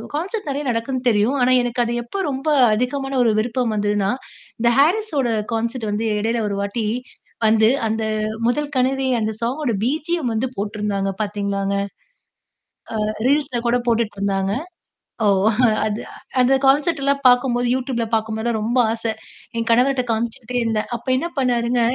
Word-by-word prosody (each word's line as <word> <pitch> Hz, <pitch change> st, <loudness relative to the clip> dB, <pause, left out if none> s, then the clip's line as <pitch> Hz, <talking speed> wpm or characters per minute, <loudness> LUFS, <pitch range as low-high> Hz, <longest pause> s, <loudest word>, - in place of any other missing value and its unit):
Concert 380 Hz, +5 st, -3 dB
நெறைய 280 Hz, +1 st, -2 dB
நடக்குதுன்னு 250 Hz, +2 st, -2 dB
தெரியும். 225 Hz, +5 st, +2 dB
ஆனா, 255 Hz, +1 st, +4 dB
எனக்கு 245 Hz, 0 st, 0 dB
அது 235 Hz, -, -2 dB
எப்ப 385 Hz, +11 st, -4 dB
ரொம்ப 270 Hz, +3 st, -5 dB, 0.3 s
அதிகமான 270 Hz, +4 st, -1 dB
ஒரு 225 Hz, -, +3 dB
விருப்பம் 235 Hz, 0 st, 0 dB
வந்ததுன்னா, 205 Hz, -1 st, +1 dB, 0.5 s
இந்த 235 Hz, 0 st, +4 dB
ஹாரிஸ்ஸோட 310 Hz, -, +2 dB, 0.2 s
கான்செர்ட் 230 Hz, 0 st, -2 dB
வந்து 215 Hz, +2 st, -1 dB
இடையில 230 Hz, +2 st, 0 dB
ஒரு 200 Hz, -, -2 dB
வாட்டி 200 Hz, +3 st, -2 dB, 0.6 s
வந்து, 220 Hz, 0 st, +5 dB, 0.2 s
அந்த 220 Hz, +1 st, -1 dB, 0.5 s
"முதல் 295 Hz, +4 st, -2 dB
கனவே" 265 Hz, +1 st, +1 dB
அந்த 220 Hz, 0 st, -1 dB
சாங்கோட 250 Hz, +2 st, -1 dB
பீஜியம் 305 Hz, 0 st, -1 dB
வந்து 250 Hz, +4 st, 0 dB
போட்டுருந்தாங்க 205 Hz, -1 st, -2 dB
பார்த்தீங்களாங்க? 200 Hz, -1 st, -2 dB, 1.3 s
அ -, -, -1 dB, 0.2 s
ரீல்ஸ்ல 280 Hz, -3 st, +1 dB
கூட 240 Hz, -, +3 dB
போட்டுட்டு 230 Hz, -2 st, +1 dB
இருந்தாங்க. 195 Hz, 0 st, 0 dB, 0.7 s
ஓ! -, -, +4 dB, 0.6 s
அது 215 Hz, 0 st, -2 dB, 0.4 s
அந்த 250 Hz, +1 st, +4 dB
கான்செல்ட்லாம் 280 Hz, 0 st, +2 dB
பார்க்கும்போது 245 Hz, -1 st, +3 dB
Youtubeல 255 Hz, -2 st, -1 dB
பார்க்கும்போதல்லாம் 220 Hz, +1 st, 0 dB
ரொம்ப 230 Hz, +4 st, -1 dB, 0.2 s
ஆசை. 225 Hz, 0 st, -2 dB, 0.5 s
என் 230 Hz, 0 st, -2 dB
கணவர்ட்ட 255 Hz, +2 st, +3 dB
காமிச்சுக்கிட்டே 235 Hz, +2 st, -3 dB
இருந்தேன். 225 Hz, -2 st, -1 dB
அப்ப 235 Hz, -, -9 dB
என்ன 270 Hz, +6 st, -1 dB
பண்ணாருங்க 245 Hz, -2 st, +1 dB
235 Hz, 140 wpm, -21 LUFS, 220-270 Hz, 1.3 s, வந்து